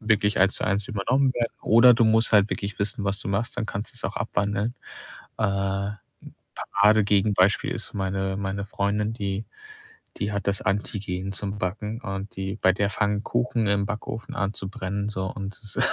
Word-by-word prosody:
wirklich 110 -2 +2
1 95 +1 +5
zu - - -2
1 100 +2 0
übernommen 130 +5 +2
werden 120 -2 -1
oder 120 +2 +7
du 115 0 +3
musst 110 +1 +3
halt 105 -1 +5
wirklich 100 0 -3
wissen, 100 0 -1
was 100 0 0
du 100 - -4
machst, 110 +4 -1
dann - - -1
kannst 105 +3 -5
du's 120 - -7
auch 95 - -3
abwandeln. 105 +2 -1 0.6
Äh, - - -1
'n 100 +1 -1 0.7
Paradegegenbeispiel 100 -1 +4
ist - - -4
meine 95 -1 -1
meine 100 0 -2
Freundin, 105 +2 -1
die 100 -1 -3 0.7
die 105 0 -1
hat 100 0 -3
das 100 -1 +1
Antigen 95 -1 -2
zum 100 +1 -4
Backen 105 +4 -3
und 95 -1 -5
die 95 +2 -3
bei 95 - +4
der 100 +1 0
fangen 105 0 0
Kuchen 120 -2 0
im 100 0 +2
Backofen 110 0 -5
an 100 +1 -1
zu 95 - -5
brennen, 100 +1 -3
so 95 -2 -3
und 100 -1 -5
das 105 -3 -6
100 Hz, 180 wpm, -25 LUFS, 100-110 Hz, 0.7 s, oder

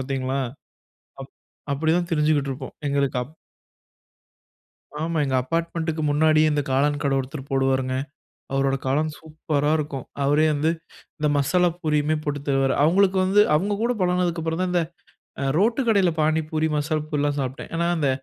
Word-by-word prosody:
பார்த்தீங்களா? 130 0 -2 0.8
அப் - - -10 0.4
அப்படி 155 +3 0
தான் 175 -1 -3
திரிஞ்சுக்கிட்டு 150 -3 +2
இருப்போம். 130 0 -8
எங்களுக்கு 140 -2 0
அப் 155 +5 -18 1.7
ஆமா. 165 0 -1
எங்க 135 -2 0
அப்பார்ட்மெண்டுக்கு 165 +2 -2
முன்னாடியே 155 +1 +4
இந்த 145 0 +1
காளான் 145 +2 +1
கடை 140 -1 +1
ஒருத்தரு 135 +2 -5
போடுவாருங்க. 135 -1 +1 0.6
அவரோட 135 0 +1
காளான் 150 +4 +1
சூப்பரா 155 -2 -2
இருக்கும். 145 -4 -4 0.2
அவரே 145 +3 +3
வந்து 150 +3 +1 0.5
இந்த 150 - +1
மசாலா 175 +5 +3
பூரியுமே 150 -1 +1
போட்டு 145 -1 -2
தருவாரு. 135 -1 +2
அவங்களுக்கு 190 +4 +3
வந்து 200 +2 +5
அவங்க 200 +6 +1
கூட 235 +2 +1
பழகுனதுக்கு 180 -2 +1
அப்புறம் 165 +2 -1
தான் 185 -1 0
இந்த 175 -1 +2 0.6
அ - - -1
ரோட்டு 230 +8 +2
கடையில 200 -5 +4
பானிபூரி, 155 0 +1
மசால் 150 +1 -1
பூரிலாம் 145 -1 -1
சாப்ட்டேன். 130 +1 -4
ஏன்னா, 170 +1 0
அந்த 150 -4 +1
150 Hz, 150 wpm, -23 LUFS, 140-165 Hz, 1.7 s, வந்து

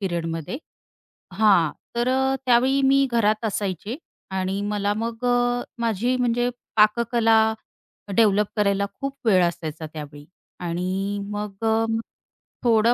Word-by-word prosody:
पिरियडमध्ये 170 - -3 0.8
हां. 195 -6 +4 0.3
तर 240 +1 +1
अ, 265 +1 +2
त्यावेळी 260 +3 +4
मी 275 +1 +4
घरात 215 -1 +2
असायचे 205 +2 -3 0.3
आणि 190 +1 -2
मला 205 0 0
मग 230 +2 -4
अ, 245 0 +2 0.2
माझी 235 +2 0
म्हणजे 245 0 +1 0.3
पाककला 220 0 +4 0.6
डेव्हलप 210 -2 +4
करायला 200 -1 +2
खूप 275 0 -3
वेळ 185 -5 +5
असायचा 160 -2 -3
त्यावेळी. 145 -1 -8 0.4
आणि 185 +3 -2
मग 210 0 -5
अ, 225 0 +3 0.8
थोडं 230 -1 +4
215 Hz, 115 wpm, -23 LUFS, 190-240 Hz, 0.8 s, वेळ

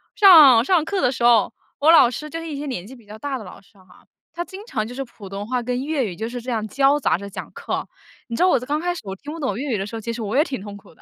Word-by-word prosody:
上 305 - +8
上 325 +2 +2
课 385 +3 -2
的 250 - +2
时 240 - -5
候， 235 -3 +4 0.3
我 305 +3 +5
老 255 -7 +7
师 300 +4 -6
就 330 - -5
是 330 - -7
一 300 - -5
些 295 - -5
年 220 -10 -5
纪 255 +6 -12
比 235 -4 -19
较 210 +1 -10
大 275 +2 -4
的 215 - -9
老 180 - -12
师 200 0 -25
哈， 185 -1 -21 0.3
他 345 +1 -5
经 385 +3 -10
常 215 - -3
就 245 - -9
是 270 +1 -4
普 215 -5 -13
通 200 +2 -6
话 250 0 -1
跟 250 +2 -2
粤 290 -4 -1
语 180 -4 -5
就 220 +4 -4
是 245 +1 -5
这 245 +2 -6
样 220 -2 -2
交 275 +5 +2
杂 - - +1
着 200 +2 -8
讲 - - -7
课， - - -4 0.4
你 235 - -5
知 355 - +1
道 370 - +5
我 - - +3
刚 290 +5 -2
开 355 +2 -1
始 350 - -8
我 190 0 -5
听 290 +9 -9
不 330 - -8
懂 265 -7 -2
粤 275 +1 -3
语 215 - 0
的 195 - -3
时 225 - -8
候， 225 - -4
其 230 +2 -4
实 230 - -6
我 215 +5 -2
也 300 - +5
挺 260 - -6
痛 205 0 -9
苦 195 - -18
的。 - - -26
250 Hz, 360 characters per minute, -22 LUFS, 215-295 Hz, 0.4 s, 上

